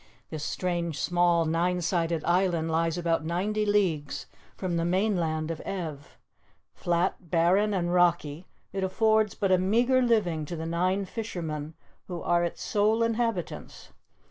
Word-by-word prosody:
This 155 -1 -5
strange 170 -2 -2
small 175 0 +2
nine 175 +3 +1
sided 165 -2 0
island 175 -2 +1
lies 165 0 +1
about 170 -2 0
ninety 205 +6 -1
leagues 175 -9 0 0.3
from 180 -3 -2
the 165 - 0
mainland 170 -4 0
of 160 - -5
Ev. 160 -7 -6 0.6
Flat, 175 0 -1
barren 180 +6 +3
and 175 -3 0
rocky, 175 -2 +1 0.3
it 195 -1 -2
affords 215 +2 +2
but 195 -2 0
a 185 - +5
meager 240 +7 +3
living 205 -10 +1
to 170 - -5
the 160 0 -5
nine 185 +4 0
fishermen 165 -8 -5 0.3
who 175 -2 -5
are 175 0 +1
its 170 - -3
sole 215 +2 +2
inhabitants. 230 -5 -3
175 Hz, 145 wpm, -27 LUFS, 165-195 Hz, 0.6 s, a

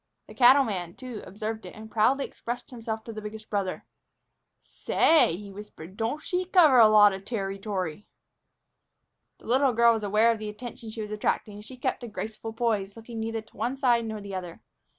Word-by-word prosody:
The - - -13
cattleman, 235 -9 +4
too, 250 -4 -8
observed 215 +3 -5
it, - - -11
and 220 0 -11
proudly 255 +6 +2
expressed 245 +2 -7
himself 225 -2 -5
to 230 - -8
the 215 - -6
biggest 215 +1 -9
brother. 200 -3 -2 0.7
"Say!" 305 - +2
he 200 0 -10
whispered, 195 -3 -11
"don't 230 +8 -2
she 365 0 -1
cover 335 -8 +6
a 225 - +9
lot 210 -1 +6
o' 190 - -5
terrytory!" 195 -4 -4 1.3
The - - -20
little 260 +2 +3
girl 235 0 +5
was 220 - -2
aware 215 +3 +4
of 225 - -3
the 215 -1 -5
attention 230 +1 -8
she 220 0 -5
was 210 - -8
attracting, 210 0 -1
and 205 +1 -10
she 255 +3 -11
kept 250 - -2
a - - -5
graceful 220 +1 -6
poise, 220 -4 -1
looking 225 0 -8
neither 225 0 -3
to 220 - -25
one 255 +3 -2
side 240 -4 +2
nor 220 -1 -5
the 200 -1 -8
other. 180 -3 -6
220 Hz, 190 wpm, -27 LUFS, 205-240 Hz, 1.3 s, a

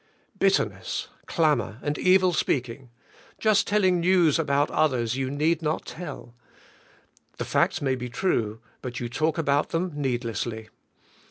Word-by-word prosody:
Bitterness, - - 0 0.2
clamor, 150 - +1
and 145 0 -1
evil 185 -1 +4
speaking, 130 -4 -1 0.5
just 215 -2 +3
telling 190 -4 +3
news 170 -3 +3
about 145 -1 +1
others 125 -6 +1
you 135 -1 -2
need 155 +4 +1
not 155 0 -1
tell; 165 -8 -8 1.0
the - - -3
facts - - +1
ma} 135 -2 +1
be 125 -1 -4
true 115 - -1 0.2
but 125 -1 -5
you 120 - -3
talk 155 +7 -1
about 145 -2 +1
them 175 +2 -1
needlesslv. 120 -5 -3
145 Hz, 135 wpm, -26 LUFS, 125-170 Hz, 1.0 s, evil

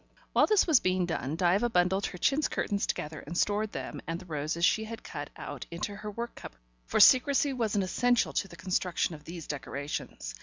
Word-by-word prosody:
While - - +5
this 425 -3 +4
was 315 -7 +5
being 185 -1 +1
done, 160 -4 -2
Diva 185 +7 +2
bundled 190 -1 +2
her 180 - -8
chintz 275 - +2
curtains 200 -2 -1
together 150 0 -3
and 165 +4 -6
stored 210 +2 +1
them - - -6
and 165 +1 -2
the 185 - -12
roses 155 +1 -1
she 220 +2 +2
had 230 +2 -8
cut - - -6
out - - -7
into 175 +4 -4
her 210 +1 -6
work 235 +3 -5
cupboard, - - -10 0.3
for - - +1
secrecy 275 +2 +6
was 225 -4 -1
an 200 - +2
essential 245 +6 +2
to 195 - 0
the 175 - -12
construction 180 0 -1
of 150 -1 -11
these 170 -2 -7
decorations. 140 - -5
185 Hz, 205 wpm, -29 LUFS, 165-220 Hz, 0.3 s, secrecy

